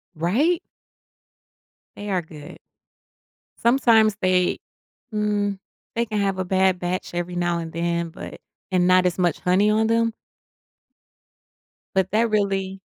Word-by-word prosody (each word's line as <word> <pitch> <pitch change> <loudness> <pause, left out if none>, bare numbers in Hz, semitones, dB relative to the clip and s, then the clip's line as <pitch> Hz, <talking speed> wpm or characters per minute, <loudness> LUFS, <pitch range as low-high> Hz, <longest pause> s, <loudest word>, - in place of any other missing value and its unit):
Right? 250 - +1 1.4
They 205 0 -7
are 185 -2 +1
good. 150 -2 -12 1.0
Sometimes 230 -4 +4
they 185 -1 +2 0.6
mm, 205 -2 0 0.4
they 235 0 +1
can 215 -1 -2
have 195 -1 0
a 185 - -1
bad 190 0 +2
batch 180 +1 -3
every 175 0 -3
now 175 -1 0
and 165 -1 -6
then 170 0 -1
but 170 - -9 0.3
and 180 -1 +2
not 185 0 +5
as 180 0 0
much 175 -2 +1
honey 190 +4 +3
on 220 +1 +2
them 230 0 +2 1.8
but 190 -1 +1
that 225 +2 +2
really 195 -2 -1
190 Hz, 130 wpm, -23 LUFS, 175-215 Hz, 1.8 s, not